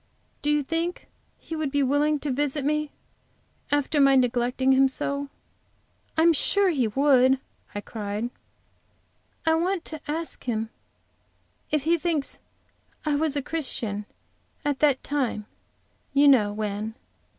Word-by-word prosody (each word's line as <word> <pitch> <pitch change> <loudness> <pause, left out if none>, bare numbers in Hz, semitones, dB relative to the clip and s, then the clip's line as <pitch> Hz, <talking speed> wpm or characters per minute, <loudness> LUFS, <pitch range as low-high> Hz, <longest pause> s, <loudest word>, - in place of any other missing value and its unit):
Do 295 - -1
you 295 -1 +2
think 330 +4 -3 0.3
he 325 - -7
would 310 -2 -1
be 285 0 +1
willing 290 +3 +2
to 295 - -2
visit 285 +1 -1
me 300 0 0 0.8
after 290 +1 +2
my 275 0 +6
neglecting 250 +1 +2
him 265 0 +5
so?" 280 +1 -3 0.9
"I 320 - +4
am 335 0 +6
sure 400 +5 +4
he 260 -8 +1
would," 265 +2 +4 0.4
I 205 - -2
cried. 210 +2 -4 1.1
"I 320 - +4
want 350 +2 0
to 315 -2 -6
ask 325 +2 -3
him 225 -2 -2 1.0
if 300 -3 +1
he 335 +2 +2
thinks 315 -4 -1 0.7
I 300 - +1
was 300 0 +1
a 285 - -1
Christian 225 -10 -2 0.6
at 290 -2 0
that 285 -3 +3
time 255 -7 -1 0.7
you 285 +1 +6
know 225 -7 +5
when. 210 +1 -3
280 Hz, 140 wpm, -26 LUFS, 250-305 Hz, 1.1 s, my